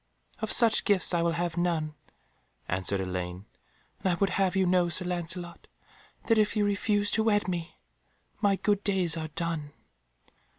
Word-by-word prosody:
"Of 220 - -2
such 230 -2 +5
gifts 195 -4 +3
I 170 - +2
will 170 0 +1
have 170 0 -3
none," 165 -3 -1 0.7
answered 95 +2 -1
Elaine, 90 0 -5 0.5
"and 190 - 0
I - - +1
would 195 +2 0
have 190 -1 0
you 190 -1 +2
know, 180 -1 +2
Sir 170 +2 +2
Lancelot, 175 0 -3 0.6
that 225 -2 +3
if 215 +1 +1
you 210 -1 +2
refuse 205 0 0
to 220 - +3
wed 205 -2 +1
me, 170 -2 -4 0.7
my 200 -2 +3
good 205 +1 0
days 185 -5 +2
are 160 -1 -4
done." 155 -2 -4
180 Hz, 165 wpm, -28 LUFS, 165-205 Hz, 0.7 s, such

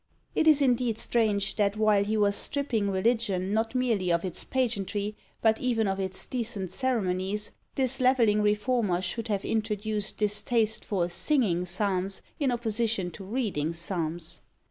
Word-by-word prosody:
It 320 - +1
is 295 -2 +6
indeed 245 -3 +1
strange, 205 -5 0
that 205 -1 +1
while 215 -2 +3
he 215 +2 -1
was 200 -1 +2
stripping 235 -8 -1
religion 195 -1 0
not 225 +3 0
merely 225 -8 +1
of 170 +2 +1
its 180 - -4
pageantry, 210 -4 -2 0.3
but 220 -1 +3
even 230 -4 +1
of 195 0 -1
its 190 -1 -2
decent 220 -7 -3
ceremonies, 205 -4 -1 0.2
this 265 -1 +5
levelling 235 -5 +4
reformer 210 -3 +1
should 225 +5 -3
have 200 -3 -2
introduced 215 -1 -2
this 210 -1 +3
taste 225 -3 0
for 185 -4 -1
singing 180 - +1
psalms 190 +1 -1 0.2
in 275 -4 +1
opposition 225 -5 -1
to 195 - -10
reading 190 - -2
psalms. 170 -1 -3
210 Hz, 150 wpm, -28 LUFS, 190-235 Hz, 0.3 s, is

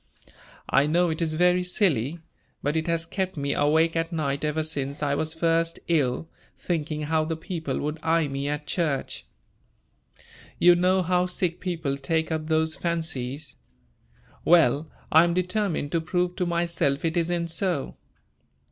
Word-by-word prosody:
I 140 - +3
know 170 +2 +2
it 160 - -3
is 160 -1 +1
very 180 +2 +4
silly, 170 - +1 0.5
but 145 +2 0
it 160 +1 0
has 165 0 0
kept 190 0 -3
me 140 0 -1
awake 160 +3 +2
at 165 +1 -1
night 140 -4 -2
ever 155 +1 0
since 145 -2 -3
I 140 -1 +1
was 160 +2 -1
first 165 0 +1
ill, 150 -2 +1 0.3
thinking 155 -3 -2
how 155 +1 +1
the 160 +1 -2
people 160 -4 -4
would 150 +2 -3
eye 165 -1 +2
me 140 +1 -3
at 150 0 -3
church. 150 -3 -2 1.3
You 175 0 +7
know 185 +2 +2
how 180 +1 +2
sick 180 -1 -2
people 165 -7 -2
take 160 +4 -1
up 155 -1 -2
those 160 0 +2
fancies. 155 -5 -3 0.9
Well, 155 -3 +4 0.2
I 160 +1 +7
am 170 0 +1
determined 185 -4 -1
to 165 - +1
prove 180 +2 -1
to 180 - 0
myself 170 -4 0
it 165 - 0
isn't 170 0 0
so. 165 -3 -2
160 Hz, 155 wpm, -26 LUFS, 150-175 Hz, 1.3 s, You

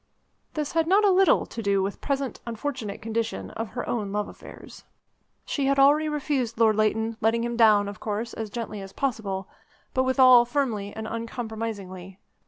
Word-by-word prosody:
This 300 -2 -2
had 325 -1 +1
not 400 +4 +4
a 400 - +5
little 380 0 +4
to 230 - -7
do 200 -2 +1
with 195 +1 -2
the - - -24
present 275 -2 -2
unfortunate 230 -3 -4
condition 225 +1 -3
of 225 -1 -5
her 245 - -4
own 210 -4 -2
love 210 0 -1
affairs. - - -12 0.6
She 280 -2 -1
had 275 0 +2
already 295 +3 +5
refused 275 -6 -2
Lord 220 -2 +5
Leighton, 220 +1 +1
letting 230 +1 +2
him 240 0 -2
down, 215 -3 +5
of 200 -1 -7
course, 220 +2 -3
as 220 -1 -5
gently 215 -2 -5
as 195 0 -10
possible, 200 -8 -2 0.5
but 260 - +2
withal 260 -2 +6
firmly 235 -6 -2
and 220 +1 -6
uncompromisingly. 220 -5 -6
230 Hz, 180 wpm, -26 LUFS, 210-265 Hz, 0.6 s, withal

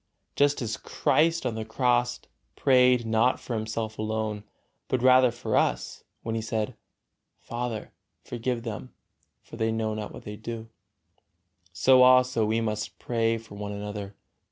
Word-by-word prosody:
Just 145 -2 +2
as 110 -1 -3
Christ 165 -1 +1
on 120 - 0
the 110 0 -4
Cross 120 +1 +1 0.3
prayed 125 -2 +4
not 115 +3 +2
for 120 - -6
Himself 110 0 -3
alone, 110 -1 -2 0.4
but 125 -1 -1
rather 130 0 +7
for 115 -2 -3
us, - - 0 0.2
when 115 - -3
He 115 - -1
said, 110 -1 -2 0.6
"Father, 120 -2 -5 0.3
forgive 120 0 -3
them, 115 +2 -6 0.5
fort 115 - -12
they 110 0 +1
know 110 -1 -1
not 105 -1 -5
what - - -10
they 105 - -7
do," 115 0 -7 1.0
so 130 +10 +5
we 130 - +8
also 125 -4 +5
must 105 -1 -3
pray 115 -1 0
for 110 -2 -12
one 105 0 -5
another. 100 -1 -6
115 Hz, 150 wpm, -27 LUFS, 110-125 Hz, 1.0 s, we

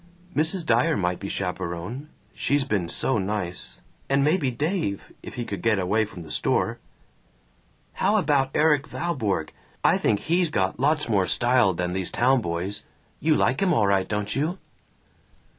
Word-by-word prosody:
"Mrs. 160 +3 +1
Dyer 120 -4 +3
might 90 -2 -1
be 100 - -5
chaperon. 95 - -4 0.2
She's 145 0 +1
been 100 -10 -1
so 130 +4 +1
nice. 95 -3 -3 0.3
And 140 0 +3
maybe 150 -2 +2
Dave, 145 - -2
if - - -9
he 120 - -3
could 100 - -5
get 115 -2 +2
away 105 +4 +1
from 95 -4 -10
the 80 - -10
store." - - 0 1.1
"How 200 +3 +1
about 145 -9 +2
Erik 150 -2 +3
Valborg? 110 - -1 0.3
I - - +4
think 100 - +1
he's 170 +1 +2
got 95 -6 -1
lots 150 +3 +2
more 100 -5 +2
style 120 -6 +3
than 90 0 -2
these 95 -1 -2
town 130 +1 +3
boys. 90 +2 -2 0.4
You 155 0 +3
like 130 0 +1
him 180 -4 +3
all 105 - +3
right, 100 -1 +2
don't 105 -1 -1
you?" 155 +7 -1
115 Hz, 160 wpm, -25 LUFS, 95-150 Hz, 1.1 s, I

